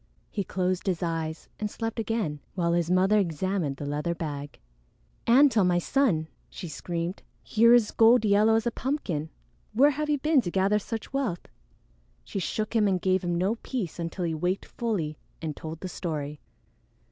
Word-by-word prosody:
He 200 - -1
closed 185 0 -1
his 180 -2 0
eyes 165 -1 -3
and 210 - -2
slept 225 +2 -4
again, 215 -10 -1 0.2
while 170 -2 +1
his 170 -1 +1
mother 190 +4 +4
examined 170 -4 -1
the 145 - -5
leather 150 +4 -2
bag. 145 -3 -5 0.7
"Antone, 235 -5 +6
my 175 -1 +3
son!" 175 - +1 0.2
she 180 - -7
screamed. 170 +3 -4 0.2
"Here 230 +2 +5
is 230 -3 +3
gold 225 0 +5
yellow 210 +2 +5
as 225 +1 +1
a 240 - +1
pumpkin! 215 - -2 0.4
Where 275 +7 +6
have 300 +1 -3
you 295 - +3
been 300 0 +3
to 180 - -3
gather 195 +3 +2
such 225 +4 -6
wealth?" 255 -11 -1 0.8
She 195 - -4
shook 215 +5 -2
him 215 -2 +4
and 190 -2 +1
gave 185 +1 +1
him 175 -1 0
no 195 +6 +1
peace 205 - -4
until 170 +2 -3
he 165 - -1
waked 180 +5 -1
fully 180 -11 -3 0.2
and 155 -2 -4
told 160 +2 -7
the 185 - -4
story. 150 -5 -4
185 Hz, 175 wpm, -27 LUFS, 165-225 Hz, 0.8 s, Antone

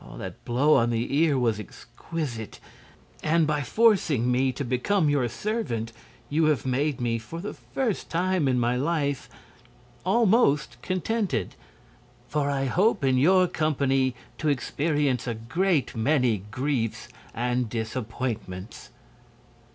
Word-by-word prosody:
That - - -8
blow 140 +6 +4
on 115 0 +2
the 120 +3 -1
ear 150 -2 +3
was 115 -4 +1
exquisite, 120 - -6 0.6
and 160 +1 +3
by 150 -1 0
forcing 155 - +3
me 130 +1 +2
to 130 +2 -4
become 145 +7 +1
your 140 -4 +2
servant 120 - -3 0.3
you 155 +2 +2
have 150 -6 +1
made 135 +3 0
me, 115 -1 0
for 115 +10 -8
the 200 - -5
first 240 -7 -3
time 180 -2 +1
in 125 -1 +2
my 120 +1 +1
life, 145 0 -1 0.7
almost 185 - +2
contented. 185 - -1 0.7
For 145 -1 0
I 135 -1 0
hope 180 - +2
in 130 -1 +3
your 185 +6 +5
company 135 -5 +1 0.2
to 155 - +1
experience 145 -1 0
a 115 - -1
great 145 - 0
many 115 -4 +1
griefs 130 -2 -2 0.3
and 125 0 0
disappointments." 110 -3 -5
135 Hz, 130 wpm, -26 LUFS, 120-165 Hz, 0.7 s, your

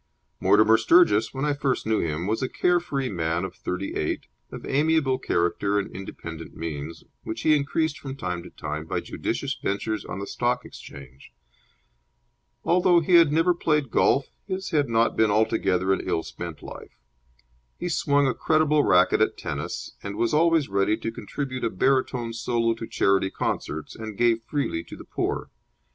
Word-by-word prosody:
Mortimer 110 +1 +5
Sturgis, 110 - +4
when 135 +2 -3
I 150 - +2
first 140 -3 -1
knew 110 0 +1
him, 80 +1 -2
was 110 +3 -1
a 130 - -1
care 180 0 +2
free 140 -6 -3
man 85 -3 -1
of - - -7
thirty 90 +2 -4
eight, - - -2 0.3
of - - -8
amiable 145 -2 +2
character 100 0 0
and 100 - -3
independent 85 -4 -8
means, 80 -1 -6 0.2
which 110 +1 -5
he 155 +4 +4
increased 150 +2 0
from 135 -4 -6
time 90 -9 -4
to 90 - -11
time 75 +1 -6
by - - -1
judicious - - -3
ventures 105 +2 -2
on - - -6
the 100 - -4
Stock 125 +3 -1
Exchange. 70 -1 -12 1.3
Although 175 0 +4
he 170 +3 0
had 165 -3 +7
never 165 +3 +3
played 150 -7 0
golf, 140 - +2 0.2
his 190 0 -4
had 145 -5 +2
not 115 0 +2
been 110 -1 +3
altogether 100 -3 +2
an - - -1
ill 80 - -1
spent 85 -3 -8
life. - - -10 0.8
He - - -4
swung 145 -4 +2
a 130 - +2
creditable 155 -1 +2
racket 90 0 +4
at - - +2
tennis, - - -5
was 100 +3 -1
always 165 -1 +3
ready 100 +2 +1
to 115 - -4
contribute 130 +4 -5
a 115 - +2
baritone 125 +1 0
solo 115 0 0
to 115 0 -7
charity 95 -1 +2
concerts, 80 -4 -3
and 110 -2 -7
gave 115 -1 +3
freely 115 - -2
to - - -10
the - - -11
poor. - - -3
115 Hz, 170 wpm, -25 LUFS, 95-145 Hz, 1.3 s, had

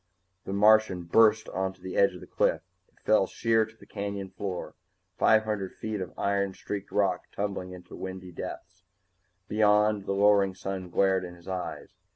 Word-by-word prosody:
The - - -5
Martian 105 -3 +4
burst 110 +4 +4
onto 95 0 -3
the 95 - -7
edge 100 -2 +4
of 90 - -10
the - - -9
cliff. - - 0 0.2
It - - -32
fell 105 -3 +3
sheer 115 +1 +2
to 110 0 -19
the - - -16
canyon 100 -2 -5
floor, 95 -3 -5 0.4
five 110 0 +4
hundred 105 -3 -3
feet 110 -2 -4
of 90 - -5
iron 100 -1 0
streaked 100 -1 -6
rock 95 -3 +1
tumbling 100 -2 -3
into 90 -1 -11
windy 95 -1 -7
depths. 90 +1 -8 0.6
Beyond, 105 -1 +3
the - - 0
lowering 100 -1 +4
sun 95 -1 -5
glared 95 +1 +2
in 90 -1 -8
his 85 -1 -18
eyes. 95 -1 -5
100 Hz, 175 wpm, -28 LUFS, 95-105 Hz, 0.6 s, Martian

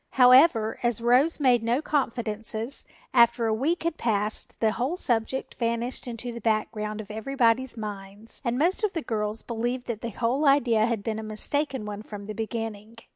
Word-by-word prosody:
However, 250 -3 +5
as 240 -2 +1
Rose 250 +8 +3
made 250 -4 +4
no 235 +3 +1
confidences, 230 -4 -2 0.3
after 235 -1 +4
a 220 - +1
week 300 +11 0
had 335 -1 -1
passed 210 -2 -1
the 220 -1 +2
whole 265 +10 -2
subject 240 -2 -1
vanished 235 +2 -1
into 240 0 -5
the 235 0 -8
background 215 -1 -1
of 215 -1 -7
everybody's 240 +2 +1
minds 205 0 -4
and 240 -1 -1
most 350 - +1
of 425 - +1
the 330 - -3
girls 215 -1 -2
believed 240 +2 -3
that 225 -3 -4
the 235 - -3
whole 245 +7 0
idea 235 -6 +4
had 230 -4 -2
been 220 0 -2
a - - -6
mistaken 260 +4 -2
one 210 0 -6
from 205 -2 -9
the 215 - -5
beginning. 225 0 -5
230 Hz, 180 wpm, -26 LUFS, 215-255 Hz, 0.3 s, However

